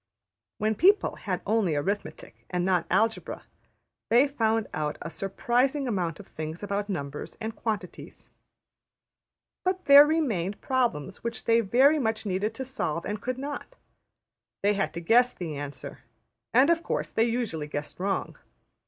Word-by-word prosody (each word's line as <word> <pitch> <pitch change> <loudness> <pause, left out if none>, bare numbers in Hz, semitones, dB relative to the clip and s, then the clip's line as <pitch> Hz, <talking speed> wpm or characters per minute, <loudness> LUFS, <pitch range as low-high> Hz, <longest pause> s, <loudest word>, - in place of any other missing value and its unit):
When 215 +1 +1
people 385 - +4
had - - -3
only 210 -8 +1
arithmetic 195 +8 -4
and 180 -1 -1
not 180 -3 +1
algebra, 225 0 0 0.7
they 245 +5 +5
found 225 -5 +1
out 150 -1 -2
a 165 - -6
surprising 245 - 0
amount 185 -7 -2
of 205 - -10
things 155 +3 -7
about 205 +1 -2
numbers 145 -6 -5
and 225 0 -4
quantities. 210 -5 -5 1.4
But 370 0 -1
there 285 +1 +9
remained 215 - 0
problems 235 - -1
which 230 -1 -4
they 230 0 +4
very 260 +8 +4
much 220 -3 -1
needed 205 +3 -1
to 265 - -5
solve 170 - -3
and 210 0 -4
could 255 +3 -3
not. 285 - -6 0.9
They 205 +1 +4
had 195 -1 -1
to 170 - -4
guess 240 +8 +4
the 165 -4 -5
answer; 145 -1 -7 0.5
and, 260 +8 +5
of 335 0 +2
course, - - -3
they 225 - +2
usually 225 -11 -2
guessed 150 +2 -6
wrong. 195 +1 -2
220 Hz, 150 wpm, -27 LUFS, 180-250 Hz, 1.4 s, there